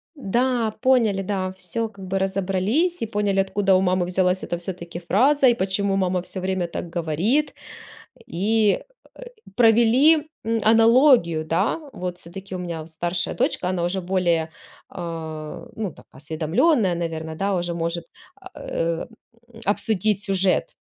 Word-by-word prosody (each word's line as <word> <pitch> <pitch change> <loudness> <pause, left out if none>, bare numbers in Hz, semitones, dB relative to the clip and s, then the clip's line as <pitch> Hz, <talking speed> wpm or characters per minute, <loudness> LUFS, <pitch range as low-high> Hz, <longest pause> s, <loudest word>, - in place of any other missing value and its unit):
да, 240 -1 0
поняли, 230 -7 +3
да, 190 -1 -2
всё 215 +5 -3
как 195 -3 -11
бы 190 +1 -1
разобрались, 195 - 0
и - - 0
поняли, 205 -3 0
откуда 195 0 +2
у 185 - +3
мамы 185 -1 +1
взялась 180 0 +1
эта, 175 - -3
всё-таки, 170 -1 -6
фраза 260 +11 +3
и 240 - +6
почему 195 0 0
мама 185 -1 +1
всё 185 +1 -5
время 185 -2 -1
так 170 0 -7
говорит. 190 - 0 0.7
И, 210 - +1 0.3
э, - - -14 0.3
провели, 245 +7 +5 0.2
м, 225 0 +1
аналогию, 225 - +5
да. 180 - 0
Вот, 180 -1 -5
всё-таки 190 +2 -9
у - - -6
меня 170 -3 -5
старшая 170 +2 -2
дочка, 245 - 0
она 180 -2 -1
уже 190 +2 -1
более, 175 -3 0 0.4
а, 160 -3 -6
ну 210 -6 -3
так, - - -18
осведомлённая, 170 - +1
наверно, 160 -2 -4
да, 195 +2 0
уже 175 -1 -2
может, 170 0 -3 0.5
э, 165 0 -3 0.5
м, 225 - -12
обсудить 205 0 0
сюжет, 190 -1 +1
190 Hz, 145 wpm, -23 LUFS, 175-220 Hz, 0.7 s, и